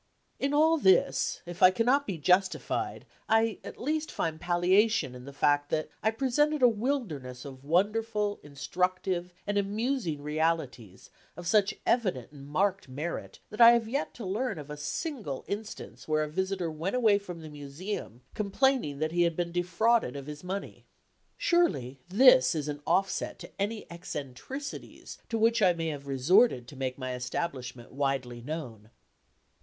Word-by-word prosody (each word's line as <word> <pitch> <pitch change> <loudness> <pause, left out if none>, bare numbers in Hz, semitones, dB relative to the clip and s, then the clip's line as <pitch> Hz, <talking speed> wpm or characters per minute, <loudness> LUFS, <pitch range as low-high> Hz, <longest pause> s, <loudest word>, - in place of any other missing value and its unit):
In 275 - 0
all 315 +2 +4
this, 190 -7 +3
if 175 0 -8
I 185 - +9
cannot 245 +8 +2
be 190 -5 -3
justified, 185 +5 +1 0.2
I 225 0 +3
at - - -9
least 310 +3 -1
find 160 -1 -3
palliation 180 - +2
in 125 0 -10
the 140 - -8
fact 145 +1 +2
that 155 0 -1
I 220 - +3
presented 275 +5 +1
a - - +9
wilderness 205 - -2
of 135 -1 -10
wonderful, 210 +5 +1
instructive 180 +5 -2
and 205 0 +1
amusing 205 - -1
realities 150 - -2 0.3
of 175 - -8
such 205 +3 +3
evident 185 - 0
and 140 -2 -12
marked 190 +2 0
merit 150 +6 -5
that 210 - -2
I 235 0 +10
have 235 -2 +1
yet 275 +6 -2
to 230 - -7
learn 215 +4 -2
of 150 -1 -8
a - - -4
single 170 - -4
instance 210 +2 -6
where 155 0 +2
a - - -3
visitor 190 0 -1
went 165 +8 -3
away 220 -5 +4
from 180 -4 -8
the 155 - -9
Museum 145 - -6
complaining 210 - +1
that 155 +2 -1
he 175 +1 +1
had 170 -1 +2
been 175 0 -2
defrauded 180 - +1
of 140 -1 -6
his 150 +2 -8
money. 195 +2 -5 0.5
Surely 140 - +1
this 190 - +6
is 150 -2 -2
an 145 -1 -4
offset 190 +3 0
to - - -10
any 210 +2 -2
eccentricities 170 - -7
to 230 - -1
which 225 +1 +3
I 185 -3 +5
may 165 -1 -2
have 140 -2 -6
resorted 140 - +3
to 145 - -11
make 130 -1 -3
my 130 -1 -4
establishment 125 -3 -4
widely 135 -3 -2
known. 120 -7 -6
175 Hz, 160 wpm, -29 LUFS, 145-220 Hz, 0.5 s, I